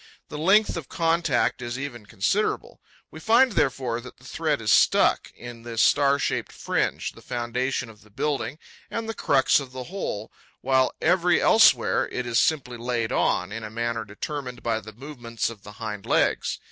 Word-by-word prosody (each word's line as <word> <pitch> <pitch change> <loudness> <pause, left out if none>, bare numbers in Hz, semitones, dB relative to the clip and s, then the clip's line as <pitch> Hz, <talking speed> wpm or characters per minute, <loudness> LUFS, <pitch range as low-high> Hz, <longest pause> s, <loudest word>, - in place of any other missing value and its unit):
The 150 - -6
length 195 +5 +3
of 155 -6 -7
contact 165 -7 +1
is 120 +1 -4
even 125 -6 -7
considerable. 120 - -1 0.3
We - - -10
find, 235 +3 +4
therefore, 125 - 0
that 125 - -12
the 120 - -22
thread 150 +2 -1
is 110 -2 0
stuck - - +4
in 120 -1 -10
this 115 -1 -5
star 140 +4 +4
shaped - - -2
fringe, - - -2
the - - -16
foundation 125 +1 -2
of 110 -2 -15
the 105 - -20
building 135 +3 -2 0.3
and 225 -1 -4
the 225 - -3
crux 135 -11 +3
of 130 -2 -9
the 130 -1 -5
whole, 190 - -4 0.3
while 130 0 +2
every 175 +1 +3
elsewhere 170 - +4
it 125 - -3
is 120 -2 +1
simply 130 -6 0
laid 120 -1 -2
on, 90 +2 +1
in 110 +1 -5
a 110 - -6
manner 115 0 -2
determined 125 +4 -6
by 115 -1 0
the 110 - -11
movements 120 -2 -4
of 110 -3 -12
the 105 +1 -11
hind 105 -2 -6
legs. - - +1
125 Hz, 180 wpm, -25 LUFS, 115-150 Hz, 0.3 s, find